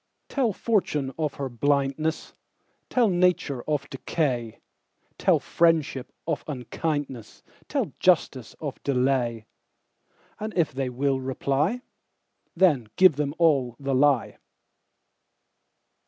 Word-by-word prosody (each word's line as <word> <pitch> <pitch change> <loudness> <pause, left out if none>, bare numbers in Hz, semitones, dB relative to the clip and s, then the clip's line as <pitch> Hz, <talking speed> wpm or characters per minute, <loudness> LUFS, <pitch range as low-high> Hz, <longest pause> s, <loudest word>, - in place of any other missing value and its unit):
Tell 255 -6 +1
fortune 165 - 0
of 150 -3 -1
her 140 - -3
blindness; 140 +4 -1 0.6
Tell 245 -3 +3
nature 175 -8 +1
of 150 -2 -1
decay; 130 -5 -2 0.6
Tell - - +4
friendship 160 -6 +1
of - - -2
unkindness; 140 -3 -4 0.2
Tell - - -2
justice - - +1
of - - -6
delay; 125 -4 0 0.9
And 215 -1 -5
if 165 -5 +2
they 135 -1 -2
will 135 +2 0
reply, 140 - -1 0.7
Then 160 - +3
give 185 -5 +6
them 145 0 -1
all 140 -8 +2
the 140 -1 -2
lie. 135 -2 +2
140 Hz, 105 wpm, -26 LUFS, 130-165 Hz, 0.9 s, give